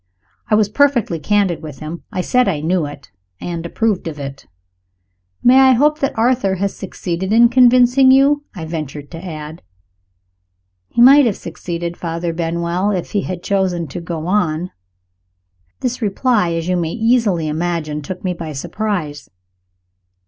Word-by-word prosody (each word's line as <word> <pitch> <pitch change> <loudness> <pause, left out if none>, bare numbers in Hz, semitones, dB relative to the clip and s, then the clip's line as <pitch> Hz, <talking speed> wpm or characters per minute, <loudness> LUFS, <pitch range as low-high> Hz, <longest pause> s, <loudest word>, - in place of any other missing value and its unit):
I 215 - +4
was 210 -1 +3
perfectly 240 - +1
candid 200 -1 +1
with 150 -4 -9
him 155 +2 -7
I 185 - -2
said 250 +6 +2
I 170 -7 0
knew 165 0 0
it, 145 -1 -12 0.3
and 170 -1 -5
approved 210 -1 -1
of 155 -2 -6
it. 140 -1 -8 1.0
"May 255 +2 +6
I 265 -1 +6
hope 300 +5 +2
that 275 - -2
Arthur 230 -4 +2
has 195 +1 -2
succeeded 185 0 -4
in 235 +2 +6
convincing 250 +1 +5
you?" 280 +2 +4
I 165 -4 -6
ventured 150 -3 -6
to 165 0 -8
add. 155 -2 -8 1.3
"He 235 - +3
might 275 +1 +7
have 210 - -1
succeeded, 170 0 -6
Father 170 0 -3
Benwell, 170 +3 -1
if 185 -4 -3
he 205 - 0
had 180 -2 -6
chosen 185 -4 0
to 175 - -6
go 165 -1 -5
on." 180 -3 0 1.1
This 250 0 -2
reply, 210 -3 +1
as 165 0 -3
you 180 0 +1
may 165 -2 -2
easily 225 -8 +1
imagine, 155 -1 -2
took 180 +5 -7
me 185 -2 -1
by 165 -3 -7
surprise. 155 -1 -4
180 Hz, 155 wpm, -18 LUFS, 165-230 Hz, 1.3 s, might